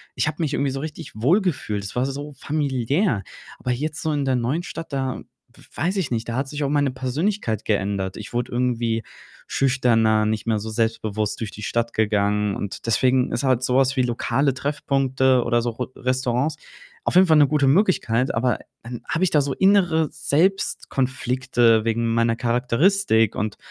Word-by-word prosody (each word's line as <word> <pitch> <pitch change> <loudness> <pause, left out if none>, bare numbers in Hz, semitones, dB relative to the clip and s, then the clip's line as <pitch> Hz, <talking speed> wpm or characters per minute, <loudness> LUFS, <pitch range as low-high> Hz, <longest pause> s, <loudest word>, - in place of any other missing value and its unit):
ich - - 0
habe 155 - -2
mich 150 -3 -1
irgendwie 140 -1 0
so 135 - -4
richtig 155 +2 -7
wohlgefühlt. 130 - 0
Es 100 - -7
war 125 +2 +1
so 145 +2 -6
familiär. 140 - 0 0.4
Aber 125 - -5
jetzt 150 +5 -3
so 160 - -1
in 145 -2 -1
der 130 -1 +1
neuen 130 +8 -1
Stadt, 165 -3 -7
da 135 -1 -2 0.5
weiß 185 +5 -1
ich 165 -9 -1
nicht, 115 -1 -2
da 115 - -3
hat 135 +1 -1
sich 150 0 -3
auch 140 - 0
meine 145 -2 +1
Persönlichkeit 130 - -2
geändert. 100 -2 -1
Ich 105 +2 -9
wurde 120 0 -2
irgendwie 120 -2 0 0.4
schüchterner, 115 -5 +2
nicht 110 0 -2
mehr 110 -2 +1
so 110 +2 -6
selbstbewusst 110 -2 -1
durch 110 -3 -3
die 105 - -10
Stadt 115 +2 -1
gegangen 105 -1 +1
und 100 +2 -6
deswegen 125 +3 +2
ist 120 +3 -2
halt 130 -2 +2
so 125 +1 +2
was 135 0 +3
wie 130 - +3
lokale 125 +3 0
Treffpunkte 130 -2 +1
oder 120 0 +1
so 120 - -1
Ro 125 +2 -5
Restaurants 130 +3 0 0.5
auf - - -1
jeden 185 +1 +7
Fall 160 -3 +4
'ne 145 -2 +6
gute 150 -1 +2
Möglichkeit, 135 - +2
aber 120 0 +1 0.2
dann 120 0 -7
habe 170 - 0
ich 185 - +2
da 150 - +4
so 135 -1 -2
innere 180 -5 +3
Selbstkonflikte 130 - +1
wegen 115 0 0
meiner 115 0 +2
Charakteristik 125 - +2
und 105 0 -3
130 Hz, 180 wpm, -23 LUFS, 115-145 Hz, 0.5 s, jeden